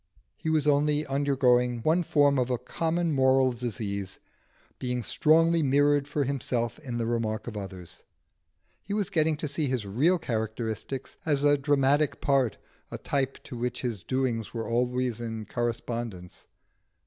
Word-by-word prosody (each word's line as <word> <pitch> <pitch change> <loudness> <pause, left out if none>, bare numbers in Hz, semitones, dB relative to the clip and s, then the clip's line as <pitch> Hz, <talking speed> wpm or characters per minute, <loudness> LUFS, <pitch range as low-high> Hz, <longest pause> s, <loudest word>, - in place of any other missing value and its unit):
He 160 - -4
was 155 -2 +2
only 150 +1 +2
undergoing 130 -4 +2
one 165 +5 +3
form 145 -4 +3
of 125 0 0
a 125 - +1
common 165 +5 -1
moral 130 -2 +4
disease: 105 -5 -4 0.6
being 125 -1 -2
strongly 165 +6 +3
mirrored 145 0 +3
for 145 0 0
himself 125 -3 -2
in 125 -6 -5
the 115 - -1
remark 115 -1 -1
of 120 - -6
others, 95 -4 -8 0.8
he 200 - -4
was 205 -2 -1
getting 160 -4 +2
to 150 - -3
see 145 +1 -1
his 125 -5 -1
real 140 - +2
characteristics 110 -1 -4
as 145 -3 +1
a 145 0 +5
dramatic 145 +1 +2
part, 135 -6 +1 0.3
a - - -5
type 135 -1 -2
to - - -9
which 120 +1 -3
his 115 -7 -3
doings 120 0 -2
were 115 - -3
always 125 0 0
in 110 -2 -5
correspondence. 115 -5 -4
130 Hz, 150 wpm, -27 LUFS, 115-145 Hz, 0.8 s, a